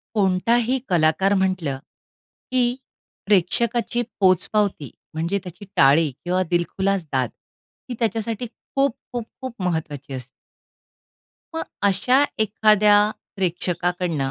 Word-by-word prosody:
कोणताही 225 +6 +2
कलाकार 175 +2 +3
म्हटलं, 185 -8 0 0.7
की 245 -1 +2 0.5
प्रेक्षकाची 230 +5 +1 0.2
पोचपावती 185 - +2 0.2
म्हणजे 170 +5 -1
त्याची 185 +3 -9
टाळी 145 +3 +5
किंवा 180 +1 +1
दिलखुलास 190 +2 0
दाद 130 -3 +1 0.6
ही 250 - -4
त्याच्यासाठी 225 +1 -1
खूप, 275 +2 -2 0.2
खूप, 240 -2 -3 0.2
खूप 260 -2 -6
महत्वाची 155 -6 -3
असते. 125 -2 -6 1.3
मग 325 - -1 0.2
अशा 205 +7 +3 0.2
एखाद्या 210 -1 +4 0.4
प्रेक्षकाकडनं 175 -4 -1
190 Hz, 95 wpm, -22 LUFS, 170-225 Hz, 1.3 s, टाळी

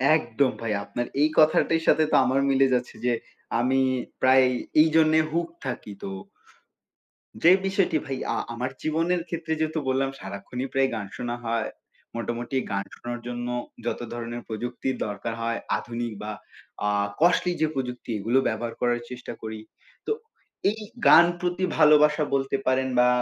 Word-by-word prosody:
একদম 130 -2 +1
ভাই, 115 -2 -1
আপনার 120 +3 -3 0.2
এই 155 - +5
কথাটির 160 +1 +4
সাথে 155 - +5
তো - - +4
আমার 130 +2 +2
মিলে 135 0 +4
যাচ্ছে 125 -1 -1
যে 120 - +3 0.5
আমি 130 +2 +2 0.4
প্রায় 130 0 +6 0.3
এইজন্যে 160 0 +4
হুকড 170 0 -1
থাকি 110 -4 -5
তো 95 - -4 1.3
যে 170 - +8
বিষয়টি 190 -4 +2
ভাই 135 -1 -3 0.2
আ - - -1 0.2
আমার 125 +2 -2
জীবনের 165 +3 +1
ক্ষেত্রে 165 -1 -2
যেহেতু 155 0 0
বললাম 135 +1 +1
সারাক্ষণই 100 +7 -5
প্রায় 135 0 +3
গান 105 -2 -4
শোনা 120 0 -3
হয় 115 -1 0 0.5
মোটামুটি 120 +2 -3
গান 100 0 0
শোনার 120 0 -6
জন্য 120 0 -4 0.4
যত - - -2
ধরনের 120 0 -5
প্রযুক্তির 120 +3 -3
দরকার 115 +3 -4
হয় 115 0 -1 0.2
আধুনিক 120 0 -4
বা 105 - -4 0.6
আ - - +2 0.3
কস্টলি 180 +1 +4
যে 155 - +4
প্রযুক্তি 125 -2 -4
এগুলো 115 +6 +1
ব্যবহার 120 -1 -2
করার 120 -1 +2
চেষ্টা 125 0 -7
করি 110 -1 -6 0.5
তো - - -1 0.6
এই 220 +2 -4 0.3
গান 170 - +9
প্রতি 180 +1 -2
ভালোবাসা 150 0 +6
বলতে 135 0 0
পারেন 130 0 +2
বা 125 - +6
130 Hz, 150 wpm, -26 LUFS, 120-155 Hz, 1.3 s, গান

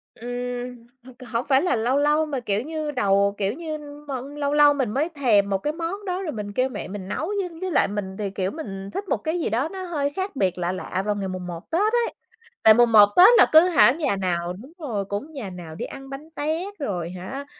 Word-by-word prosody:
Ừm, 245 +1 -5 0.3
h 255 0 -14
hổng 230 +2 0
phải 265 0 +5
là 360 - +1
lâu 240 +5 +1
lâu 300 +2 +3
mà, 280 -4 -3
kiểu 210 -2 -1
như, 310 +1 -4
đầu, 200 -5 +2
kiểu 200 +1 0
như, 310 0 -5
m 290 -2 -8
lâu 285 0 -1
lâu 295 -1 +6
mình 265 -6 -1
mới 295 +7 0
thèm 230 -10 +2
một 195 - +1
cái 295 +10 -3
món 345 +5 -4
đó 370 +1 -2
rồi 325 -5 -3
mình 205 -2 -6
kêu 255 +3 +1
mẹ 210 - -6
mình 190 -1 -7
nấu, 315 - -3
với 360 -2 -2
với 375 -1 -2
lại - - +3
mình 195 -2 -4
thì, 205 -2 -2
kiểu, 190 0 -2
mình 195 -10 -7
thích 395 0 -4
một - - +2
cái 330 +2 -2
gì - - -1
đó 245 +8 0
nó 380 -1 -6
hơi 295 -5 -1
khác 380 -4 -3
biệt 185 -6 0
lạ 175 0 -1
lạ 185 +1 -3
vào 210 -1 0
ngày 195 -2 -3
mùng 185 -1 -5
một 170 +1 -8
Tết 415 +7 +2
ấy. 475 -1 +1 0.5
Tại 220 - +9
mùng 240 0 +4
một 210 -2 +9
Tết 365 +3 +10
là - - +8
cứ 315 - +10
hả 315 -7 +6
nhà 285 -8 0
nào 175 -2 -1
đúng 245 - -12
rồi, 220 -10 -3
cũng 205 +11 -5
nhà 235 -9 -6
nào 170 -3 -9
đi - - -4
ăn 270 0 -10
bánh 285 +4 -8
tét 325 +7 -2
rồi 180 - -3
hả, 190 +11 -7
255 Hz, 250 wpm, -24 LUFS, 200-305 Hz, 0.5 s, Tết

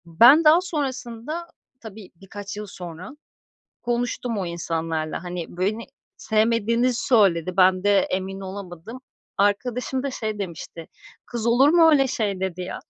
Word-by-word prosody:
Ben 235 - +6
daha 315 +3 +6
sonrasında, 285 -1 -4 0.3
tabii, 215 -3 -11
birkaç 195 +2 -9
yıl 210 - -5
sonra, 180 -1 -9 0.7
konuştum 240 -1 -2
o 195 - -2
insanlarla. 165 -2 -3
Hani, 175 -1 -5
beni 210 +5 -1 0.3
sevmediğini 230 +2 +1
söyledi, 190 -8 +2
ben 185 0 +4
de 205 -1 +4
emin 190 +1 -3
olamadım. 195 +4 -8 0.4
Arkadaşım 245 +6 0
da 280 - -2
şey 215 -4 -4
demişti, 170 -3 -7 0.4
"Kız 235 -1 -4
olur 250 +5 +5
mu 330 0 +6
öyle 275 -3 +4
şey?"dedi 190 -6 -2
ya. 180 - -6
205 Hz, 130 wpm, -23 LUFS, 185-245 Hz, 0.7 s, Ben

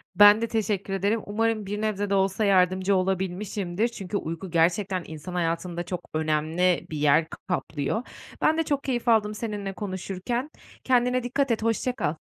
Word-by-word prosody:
Ben 205 +1 +8
de 230 - 0
teşekkür 205 -3 -1
ederim. 200 +4 +1
Umarım 220 0 0
bir 205 +2 -3
nebze 205 -2 -1
de 200 - +2
olsa 195 +2 +1
yardımcı 185 0 +3
olabilmişimdir 190 +2 -1
çünkü 200 -4 -4
uyku 165 +1 -5
gerçekten 180 +3 +1
insan 160 +3 -8
hayatında 170 0 -1
çok 175 0 -6
önemli 160 +3 +1
bir 155 - -4
yer 150 +2 +4 0.2
kaplıyor. 170 - -2 0.4
Ben 315 - +3
de 325 - +2
çok 285 -2 -1
keyif 245 -3 -2
aldım 215 -2 +3
seninle 205 -3 -4
konuşurken, 200 - -4 0.3
kendine 250 -1 +2
dikkat 265 +2 0
et, 225 -1 0
hoşça 230 +2 0
kal. 155 - -2
195 Hz, 160 wpm, -26 LUFS, 180-220 Hz, 0.4 s, Ben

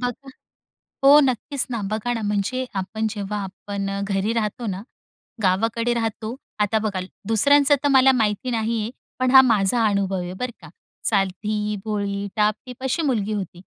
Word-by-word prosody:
बघा 250 +2 -4 0.8
हो, 285 +2 +9
नक्कीच 270 +1 0
ना, 230 -3 -2
बघा 220 +3 -1
ना 225 - -3
म्हणजे 210 +5 -1
आपण 215 +3 -2
जेव्हा 210 -1 -4
आपण 195 +1 -5
अ, 195 0 -3
घरी 200 +2 0
राहतो 230 +1 -2
ना, 190 0 -3 0.6
गावाकडे 225 +5 +1
राहतो. 225 0 -3 0.2
आता 210 +1 +2
बघा 210 -3 -2 0.3
दुसऱ्यांचं 285 +6 +5
तर - - +3
मला 265 0 +6
माहिती 220 +2 0
नाही, 225 0 -1 0.3
पण 255 0 +2
हा 265 -1 +10
माझा 225 -1 +2
अनुभव 195 -2 0
आहे 180 +1 -5
बरं 250 +5 -4
का. - - -12 0.4
साधी, 210 +1 0
भोळी, 200 -1 -2
टापटीप 220 +5 -1
अशी 265 +6 0
मुलगी 215 -8 0
होती 185 -3 -5
215 Hz, 155 wpm, -23 LUFS, 200-245 Hz, 0.8 s, हा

